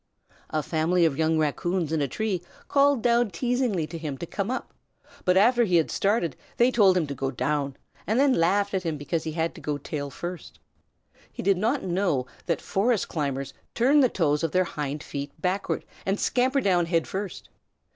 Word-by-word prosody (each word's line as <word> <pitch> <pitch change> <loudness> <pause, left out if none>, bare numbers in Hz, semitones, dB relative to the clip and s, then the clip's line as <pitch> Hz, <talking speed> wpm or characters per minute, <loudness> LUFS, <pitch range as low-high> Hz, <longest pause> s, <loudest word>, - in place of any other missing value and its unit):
A 155 -1 -1
family 170 +3 +2
of 155 -4 +1
young 160 0 +2
Raccoons 160 +2 0
in 160 -2 +1
a 140 - +1
tree 200 - -2 0.3
called 280 -3 +3
down 240 -1 +3
teasingly 240 -3 0
to 165 +1 -7
him 150 -4 -4
to 170 - -5
come 200 +4 -3
up, 255 - -4 0.5
but 180 0 +4
after 240 +4 +5
he 180 -6 +1
had 165 -2 +3
started 195 - +1 0.2
they 240 +2 +4
told 195 -6 +5
him 170 - +1
to 140 - -5
go 135 0 -2
down, 140 +1 -1 0.3
and 220 +4 +2
then 275 -1 +5
laughed 200 +2 +2
at 190 - +1
him 165 -4 -2
because 145 +3 -3
he 160 - -3
had 165 0 -1
to - - -12
go 150 -1 -2
tail 145 0 -5
first. 175 +4 -7 0.7
He - - -7
did 195 -1 +3
not 235 +7 +1
know 175 -8 0 0.2
that 170 - 0
forest 215 +2 0
climbers 140 -3 -3 0.2
turn 270 +5 +4
the 260 -3 +5
toes 150 -5 +1
of 165 - -1
their 185 - +4
hind 150 -3 -4
feet 140 +2 -6
backward 185 +4 -1 0.2
and 195 +2 -1
scamper 260 +2 +2
down 180 -6 +2
head 165 -2 +1
first. 195 -1 -5
175 Hz, 195 wpm, -26 LUFS, 155-210 Hz, 0.7 s, after